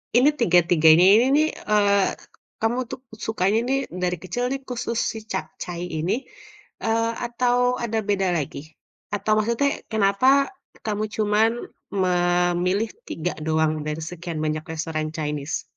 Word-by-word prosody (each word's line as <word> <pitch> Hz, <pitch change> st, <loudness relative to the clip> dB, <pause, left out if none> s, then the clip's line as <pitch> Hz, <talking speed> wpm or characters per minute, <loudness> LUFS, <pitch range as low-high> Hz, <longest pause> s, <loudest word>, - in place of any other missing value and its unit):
ini 255 Hz, +4 st, +6 dB
tiga-tiganya 170 Hz, -4 st, +5 dB
ini 235 Hz, +3 st, +5 dB
nih, 310 Hz, +1 st, +4 dB, 0.2 s
eee, 200 Hz, -1 st, +4 dB, 0.6 s
kamu 225 Hz, +2 st, +1 dB
tuh -, -, -5 dB, 0.3 s
sukanya 215 Hz, 0 st, +1 dB
nih 270 Hz, -, +2 dB, 0.2 s
dari 180 Hz, 0 st, 0 dB
kecil 185 Hz, +7 st, -3 dB
nih 275 Hz, -, -1 dB
khusus 235 Hz, -2 st, -3 dB
si -, -, -7 dB
capcay 180 Hz, -2 st, -5 dB, 0.2 s
ini, 165 Hz, +4 st, 0 dB, 0.7 s
eee, 230 Hz, 0 st, +1 dB, 0.2 s
atau 245 Hz, +1 st, +1 dB, 0.3 s
ada 225 Hz, -1 st, -1 dB
beda 195 Hz, -2 st, +2 dB
lagi? 140 Hz, -2 st, -4 dB, 0.6 s
Atau 205 Hz, +1 st, -2 dB
maksudnya 235 Hz, +6 st, +1 dB, 0.2 s
kenapa 200 Hz, +2 st, +2 dB, 0.6 s
kamu 215 Hz, -1 st, -1 dB
cuman 215 Hz, +1 st, +3 dB, 0.5 s
memilih 180 Hz, +3 st, +1 dB, 0.2 s
3 170 Hz, +2 st, -3 dB
doang 160 Hz, 0 st, +2 dB
dari 150 Hz, +1 st, -3 dB
sekian 170 Hz, -2 st, -6 dB
banyak 155 Hz, 0 st, -2 dB
restoran 155 Hz, -1 st, -3 dB
Chinese? 150 Hz, -2 st, -3 dB
195 Hz, 130 wpm, -23 LUFS, 170-225 Hz, 0.7 s, ini